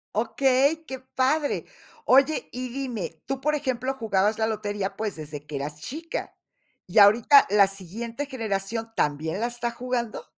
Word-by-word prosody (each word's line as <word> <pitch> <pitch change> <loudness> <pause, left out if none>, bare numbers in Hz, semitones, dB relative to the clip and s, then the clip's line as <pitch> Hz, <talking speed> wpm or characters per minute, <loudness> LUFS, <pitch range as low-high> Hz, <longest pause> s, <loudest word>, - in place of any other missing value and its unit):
Okey, 270 +7 +2
qué 265 -2 -6
padre. 265 +3 0 0.4
Oye, 275 +4 +4
y 255 0 -5
dime, 235 - -5
tú 270 0 -3
por 300 +2 +1
ejemplo, 260 -1 -1
jugabas 215 -3 +1
la 220 - +2
lotería, 205 -2 -3
pues 215 -2 -2
desde 150 -2 -8
que 150 -1 -7
eras 150 +2 -4
chica 320 - -6 0.5
y 180 +4 +3
ahorita 230 +8 +7
la 200 -1 +5
siguiente 225 - -5
generación, 225 -3 -3
¿también 155 +5 -1
la 235 - 0
está 240 0 -3
jugando? 240 -1 -3
230 Hz, 150 wpm, -25 LUFS, 195-265 Hz, 0.5 s, ahorita